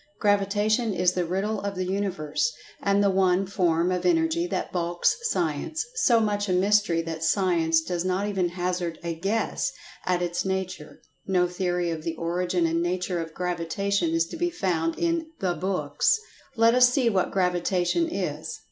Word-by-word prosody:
Gravitation 205 +2 +1
is 180 0 +3
the 180 -1 0
Riddle 195 +5 -1
of 200 0 -3
the 185 0 -2
Universe, 190 - -1 0.3
and 200 0 +2
the 200 - +4
one 190 0 +2
form 175 -2 +1
of 180 -1 -1
Energy 335 0 +2
that - - -3
balks 175 -1 +1
Science—so 240 - 0
much 205 -2 0
a - - +2
mystery 190 -2 +2
that 165 -1 -5
Science 165 -2 +2
does 175 +1 -3
not 185 +2 0
even 190 -4 0
hazard 175 -1 -2
a 170 -1 -2
"guess" 195 +7 -1 0.4
at 180 -1 +1
its 175 0 -1
nature—no 185 0 -3
theory 180 -1 -1
of 160 -1 -4
the 165 +1 -3
origin 175 +1 0
and 165 +1 +1
nature 180 0 -1
of 165 -1 -6
Gravitation 180 +1 -1
is 165 0 +2
to - - -7
be 350 +1 0
found 170 - -1
in 335 -1 0
"the 185 -2 0
books." 195 - +1 0.4
Let 230 0 +5
us 250 0 +6
see 250 -1 +1
what 195 -5 +2
Gravitation 180 - +1
is. 160 - -4
185 Hz, 165 wpm, -26 LUFS, 175-205 Hz, 0.4 s, us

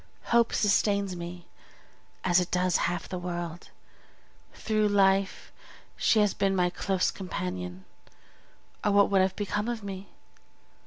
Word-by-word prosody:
Hope 235 -1 +4
sustains 200 -2 +1
me, 175 0 -7 0.8
as 180 0 +4
it 180 - -2
does 180 -1 +2
half 175 -2 -4
the 180 - -5
world; 175 -1 -5 0.8
through 215 -1 0
life 195 -1 +2 0.4
she - - +2
has 210 -1 +2
been 195 -1 +1
my 180 -1 +2
close 185 +1 0
companion, 90 - -5 1.0
or 210 - +2
what 200 0 +4
would 195 -1 +4
have 190 0 +1
become 210 +1 -2
of 235 -3 -4
me? 195 -1 -7
190 Hz, 130 wpm, -28 LUFS, 175-200 Hz, 1.0 s, Hope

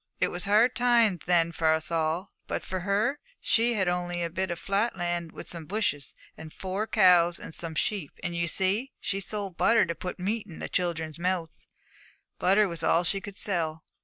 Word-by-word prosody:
It - - +2
was 175 +2 -3
hard 220 +5 +4
times 235 -8 +3
then 170 -2 +3
for 160 -1 +2
us 160 +1 -1
all, 165 +3 -1 0.2
but - - -3
for 185 - -3
her, 205 +9 0 0.2
she 235 +1 +2
only 175 -2 0
had 170 -1 -2
a - - -24
bit 190 +1 -1
of 170 - -3
flat 200 +4 0
land 175 -1 -2
with - - -9
some 165 -3 -6
bushes, 185 -9 -2 0.2
and 160 -1 -10
four 190 +5 -3
cows 180 -5 +5
and - - -9
some 165 -1 -4
sheep, 185 -4 -1
and, 175 -2 -2
you 170 0 0
see, 195 +10 0
she 195 - -2
sold 195 -1 -4
butter 230 0 +4
to 170 - -2
put 180 +2 -6
meat 210 +4 -2
in 170 - -10
the - - -5
children's 165 -3 -2
mouths. 175 -2 -2 0.7
Butter 200 +3 +4
was 170 -3 -6
all 170 - +3
she 195 +3 0
could 200 -1 -8
sell. 165 -7 -2
180 Hz, 200 wpm, -28 LUFS, 170-205 Hz, 0.7 s, cows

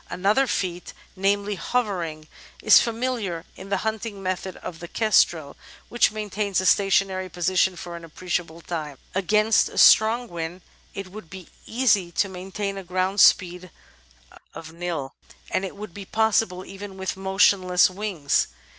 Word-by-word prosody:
Another 205 +9 +1
feat, 180 -5 -3 0.2
namely 200 +2 0
hovering, 180 -9 -2 0.4
is - - +8
familiar 230 -8 -3
in 195 - -11
the 200 - +1
hunting 215 -2 -4
methods 185 0 -3
of 165 - -7
the 170 - -8
Kestrel, 170 -8 +2 0.3
which 240 - +3
maintains 210 -2 -2
a 185 - -2
stationary 190 -1 +2
position 185 +2 +1
for 175 0 -8
an 170 - -9
appreciable 170 0 -4
time. 155 -5 -5 0.2
Against 210 +3 +2
a - - -12
strong 230 +3 +6
wind 170 0 -6 0.3
it 195 -2 -7
would 205 -5 -11
be 185 -1 -11 0.2
easy 210 -7 +2
to 200 - +1
maintain 195 +2 -5
a - - -8
grov/nd 185 +2 -1
speed 180 -1 +4 0.9
of 160 -1 -9
ml, 165 -6 -4 0.4
and 190 - 0
it 195 - -5
would 205 -3 -9
be 200 +1 -8
possible 215 -4 +1
even 195 0 -9
with 190 -1 -3
motionless 190 -1 +3
wings. 185 -7 -1
190 Hz, 145 wpm, -24 LUFS, 175-205 Hz, 0.9 s, is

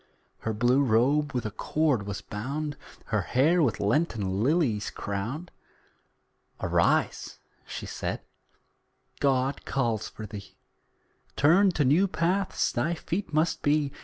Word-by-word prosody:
Her 110 - -2
blue 120 +5 +3
robe 140 +5 +2
with 125 -4 -2
a 105 - -2
cord 130 -1 0
was 100 -1 -4
bound, 140 +8 -4 0.3
Her - - 0
hair 160 +8 +3
with 125 -9 +1
Lenten 105 - 0
lilies 135 - +1
crowned. 115 - -4 1.1
"Arise," - - +1 0.3
she - - -6
said - - -4 1.0
"God 135 0 +1
calls 115 -5 -1
for 110 - -8
thee, 100 -1 -10 0.8
Turned 180 +6 +4
to 145 - +2
new 160 +10 +4
paths 185 +2 0
thy 170 +2 0
feet 175 +3 -4
must 155 +2 +1
be. 145 -1 +2
140 Hz, 125 wpm, -27 LUFS, 110-155 Hz, 1.1 s, Turned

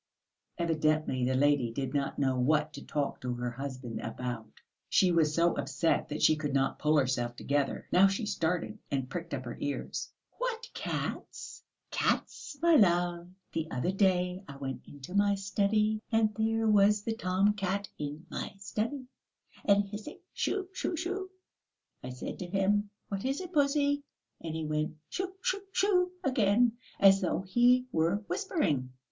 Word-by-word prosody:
Evidently 155 -5 +1
the 130 +1 +1
lady 140 -3 +3
did 130 +2 -3
not 140 -1 -1
know 135 -2 +2
what 150 +3 +2
to - - -8
talk 145 -2 -2
to 125 -1 -2
her 120 0 -3
husband 130 -2 -5
about. 115 -1 -5 0.3
She 185 -2 +4
was 160 -3 +3
so 170 +1 +4
upset 145 +4 0
that 150 - -3
she 155 - +6
could 145 -2 -2
not 135 0 +1
pull 155 0 +3
herself 125 -3 +1
together. 140 +2 -1
Now 190 +2 +7
she 195 +3 -1
started 180 +2 -1
and 135 -2 -2
pricked 170 +1 -5
up 130 -1 -6
her 120 - -5
ears. 145 0 -3 0.3
"What 485 -1 -3
cats?" - - -5 0.3
"Cats, 290 - -1
my 340 0 +6
love. 175 -3 +3 0.3
The 160 -1 -2
other 130 +9 -1
day 185 -1 +1
I 140 - -8
went 135 -2 -6
into 145 +4 -10
my 200 0 +3
study, 210 +2 +1
and 220 -1 +3
there 225 0 +1
was 205 0 +5
the 225 - -1
tom 195 -1 +2
cat 200 0 -2
in 150 +2 -5
my - - -4
study, 225 +7 -3 0.6
and 200 0 +5
hissing 205 +1 -8 0.2
shoo 390 -2 -1
shoo 355 - -2
shoo! 375 +3 -3 0.7
I 125 - -5
said 125 0 -6
to 180 - -4
him: 200 +2 +1 0.2
'What 195 -1 -3
is 270 +2 -1
it, 365 -1 -7
pussy?' 285 -1 +2 0.4
and 160 -1 -4
he 160 -1 -2
went 155 +1 -1
shoo 375 0 -3
shoo 400 - 0
shoo 365 -3 +2
again, 235 - +3 0.3
as 195 0 +7
though 180 - 0
he 245 +6 +4
were 170 +6 +1
whispering. 155 - 0
180 Hz, 165 wpm, -30 LUFS, 145-215 Hz, 0.7 s, Now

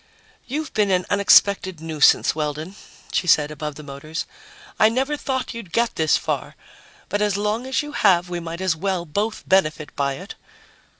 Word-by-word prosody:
"You've 300 +3 -4
been 210 -2 +2
an 185 -1 +1
unexpected 200 -3 +4
nuisance, 160 -2 +3
Weldon," 155 +4 -4 0.4
she 180 - 0
said 150 -2 +4
above 150 -1 -5
the 150 - -10
motors. 145 +3 -6 0.5
"I 215 - +6
never 265 +5 0
thought 260 -3 -3
you'd 230 -7 -9
get 235 0 +1
this 160 -1 +3
far. - - -3 0.5
But 205 +2 -1
as 205 -2 +1
long 210 +5 -1
as 265 +3 0
you 295 - -7
have, 185 -9 +3
we 175 -1 -4
might 170 +1 -6
as 185 -3 +1
well 185 +1 -2
both 205 +8 -2
benefit 155 -5 +1
by 140 -1 0
it." 185 +10 -8
185 Hz, 175 wpm, -22 LUFS, 155-215 Hz, 0.5 s, I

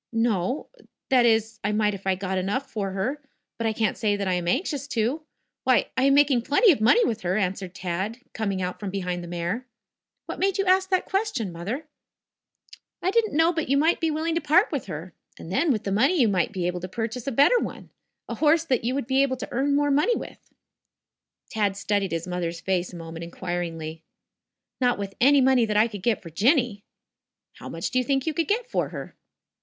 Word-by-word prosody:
"No. 225 - 0 0.4
That 250 -2 +5
is, 220 -1 +1
I 205 - 0
might 210 -1 +2
if 195 0 -8
I 190 - +3
got 190 0 -2
enough 205 +9 -2
for 200 -3 -3
her. 250 +10 -2 0.4
But 230 - 0
I - - +2
can't 215 -2 0
say 210 -2 +1
that 200 -1 -3
I 185 - +1
am 175 -1 -2
anxious 280 - -1
to. 250 +4 -1 0.4
Why, 255 -1 +2
I 260 +1 +2
am 275 0 +5
making 280 -4 +4
plenty 290 - +5
of 275 - 0
money 460 - +5
with 220 -1 -2
her," 180 +2 0
answered 190 -2 -2
Tad 190 +5 -3 0.2
coining 200 -4 -2
out 180 0 -4
from 205 - -4
behind 180 -2 -3
the - - -8
mare. 175 +9 -3 0.6
"What - - -6
made 390 0 +1
you 390 - +1
ask 375 0 +3
that 370 -1 +1
question, 390 - -1
Mother?" 205 - -5 1.2
"I 370 - +2
didn't 435 -7 +1
know 325 +2 +4
but 320 -5 -2
you 275 - +3
might 320 +4 +3
be 325 - +1
willing 315 +2 -1
to 335 - 0
part 315 +7 +3
with 280 -8 -3
her. 165 +1 -7 0.2
And 165 - -9
then, 300 - +2
with 220 -5 -1
the 195 - -3
money 270 - +3
you 240 - +5
might 185 -4 +1
be 180 -2 -3
able 180 0 -1
to 180 - -6
purchase 230 +5 -4
a - - 0
better 285 - +5
one - - -6 0.4
a - - -4
horse 315 +1 +3
that 255 -7 0
you 250 +3 0
would 275 - -2
be 265 +2 +2
able 265 -2 +1
to - - -6
earn 280 +3 +1
more 290 0 +2
money 300 +13 +3
with." - - -9 1.0
Tad 205 -3 0
studied 200 -1 -1
his 165 0 -2
mother's 175 -2 -3
face 185 -1 -1
a - - -10
moment 165 0 -7
inquiringly. 170 -2 -5 0.8
"Not 245 -2 +2
with 200 -1 -5
any 280 +2 +6
money 255 -3 +4
that 210 -1 0
I 215 +2 +5
could 205 -4 -8
get 220 0 0
for 165 - -9
Jinny." 230 - +2 0.7
"How - - -9
much - - -4
do 255 - +2
you - - +1
think 270 +1 0
you 320 - -1
could 330 +2 -1
get 450 +4 0
for - - -1
her?" - - -8
225 Hz, 225 wpm, -25 LUFS, 190-280 Hz, 1.2 s, any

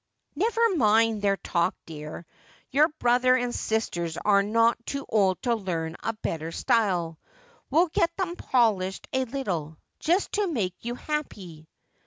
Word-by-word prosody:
' - - -55
Never 455 +4 +2
mind 225 -2 +3
their 200 -1 +2
talk, 170 -3 0
dear. 155 +1 -8 0.5
Your 295 +3 +5
brother 250 0 +4
and 245 -1 -1
sisters 175 -7 -2
are 200 -1 +3
not 230 +3 +2
too 275 +3 -4
old 195 -4 +2
to 240 - +2
learn 170 -6 -3
a 225 - -2
better 165 -6 -4
style. 175 -7 0 0.5
We'll 325 +6 +4
get 335 +1 +2
them 370 -3 -2
polished 210 - +1
a 260 0 +1
little, 180 - -4 0.2
just 350 +5 +1
to 415 -1 0
make 200 - -1
you 240 +1 -4
happy.' 195 - -5
225 Hz, 150 wpm, -26 LUFS, 180-260 Hz, 0.5 s, Your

